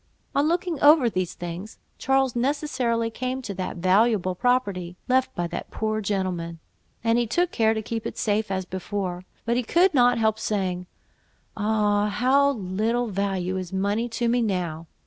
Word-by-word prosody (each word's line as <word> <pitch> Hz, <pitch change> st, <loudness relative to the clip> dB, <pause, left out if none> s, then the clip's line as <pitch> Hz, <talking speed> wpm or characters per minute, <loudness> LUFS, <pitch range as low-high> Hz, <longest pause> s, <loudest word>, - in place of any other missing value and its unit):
On 285 Hz, +2 st, +2 dB
looking 340 Hz, -2 st, 0 dB
over 290 Hz, -5 st, +6 dB
these 185 Hz, -3 st, -2 dB
things, 175 Hz, +5 st, -7 dB, 0.2 s
Charles 270 Hz, -2 st, +2 dB
necessarily 245 Hz, -3 st, 0 dB
came 255 Hz, +3 st, -3 dB
to 205 Hz, -, -4 dB
that 185 Hz, -1 st, -4 dB
valuable 185 Hz, +1 st, +3 dB
property, 195 Hz, -6 st, 0 dB
left 260 Hz, 0 st, +2 dB
by 175 Hz, -, -1 dB
that -, -, -5 dB
poor 215 Hz, 0 st, -2 dB
gentleman, 185 Hz, -4 st, -2 dB, 0.5 s
and 230 Hz, +1 st, +3 dB
he 240 Hz, -, 0 dB
took 350 Hz, +9 st, +1 dB
care 220 Hz, -1 st, +2 dB
to 220 Hz, -, -3 dB
keep 225 Hz, +1 st, -3 dB
it -, -, -7 dB
safe 215 Hz, 0 st, 0 dB
as 190 Hz, -1 st, -2 dB
before; 185 Hz, -1 st, -4 dB, 0.2 s
but 235 Hz, +1 st, +1 dB
he -, -, +2 dB
could 345 Hz, +10 st, +3 dB
not 245 Hz, -3 st, +4 dB
help 220 Hz, -1 st, +1 dB
saying—"Ah! 205 Hz, +2 st, -2 dB
of 205 Hz, -, -4 dB
how 275 Hz, +3 st, +4 dB
little 220 Hz, +3 st, -1 dB
value 190 Hz, -2 st, -1 dB
is 185 Hz, -2 st, -5 dB
money 200 Hz, +5 st, 0 dB
to 235 Hz, +1 st, -1 dB
me 240 Hz, +1 st, +2 dB
now! 175 Hz, -6 st, -2 dB
215 Hz, 165 wpm, -25 LUFS, 185-245 Hz, 0.5 s, over